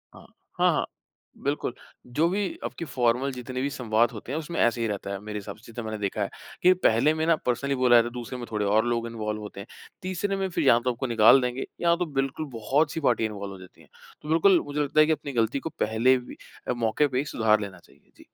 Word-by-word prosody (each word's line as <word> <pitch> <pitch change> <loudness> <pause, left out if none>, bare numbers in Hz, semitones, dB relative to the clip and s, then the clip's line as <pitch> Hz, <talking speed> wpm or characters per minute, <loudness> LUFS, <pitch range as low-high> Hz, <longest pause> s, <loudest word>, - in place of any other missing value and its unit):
हाँ, - - -14 0.3
हाँ, - - +5
हाँ, - - 0 0.6
बिल्कुल, 140 -3 -1 0.3
जो 150 +7 +1
भी 200 +2 0 0.2
आपकी 170 - -5
फ़ॉर्मल 130 -1 +1
जितने 125 0 -5
भी 140 - 0
संवाद 115 -3 +1
होते 115 +2 -8
हैं 150 - -1
उसमें 165 +2 -5
ऐसे 120 0 +2
ही 115 - +1
रहता 100 -1 -4
है 100 - -4
मेरे 105 0 -5
हिसाब 100 +1 -8
से 115 +1 -15
तो 120 - -5
मैंने 110 -1 -4
देखा 100 -2 -2
है - - -1 0.3
कि 185 +1 +7
पहले 125 +8 +4
में 160 0 -1
ना 165 - +5
पर्सनली 140 +3 0
बोला 125 -1 +4
जाता 120 0 +5
है - - -7
दूसरे 125 +1 -6
में 120 - -5
थोड़े 105 -1 -1
और 110 +3 +3
लोग 115 -1 -1
इन्वॉल्व 105 -2 -4
होते 105 -1 -9
हैं, 100 - -8 0.3
तीसरे 190 +2 -2
में 195 0 -1
फिर 175 - -1
या 120 - +6
तो 125 +1 0
आपको 120 +2 -4
निकाल 115 +3 +6
देंगे 125 +1 -2 0.2
या 170 0 +4
तो 180 - -1
बिल्कुल 135 0 -2
बहुत-सी 145 +8 0
पार्टी 120 -4 +2
इन्वॉल्व 100 -2 -5
हो 95 - -11
जाती 95 -1 -15
हैं। - - -21 0.3
तो 150 - -9
बिल्कुल, 170 +3 +5
मुझे 145 +1 -4
लगता 145 +1 +1
है 155 - +8
कि 160 - +1
अपनी 150 -2 -2
गलती 115 +3 +1
को 160 - -5
पहले 115 +4 +3
भी 125 - -9 0.3
अ, - - +1
मौके 120 +5 +1
पे 130 - -3
ही 145 - -1
सुधार 110 -5 +2
लेना 95 -3 -7
चाहिए। - - -25
जी। - - -17
125 Hz, 250 wpm, -26 LUFS, 110-145 Hz, 0.6 s, है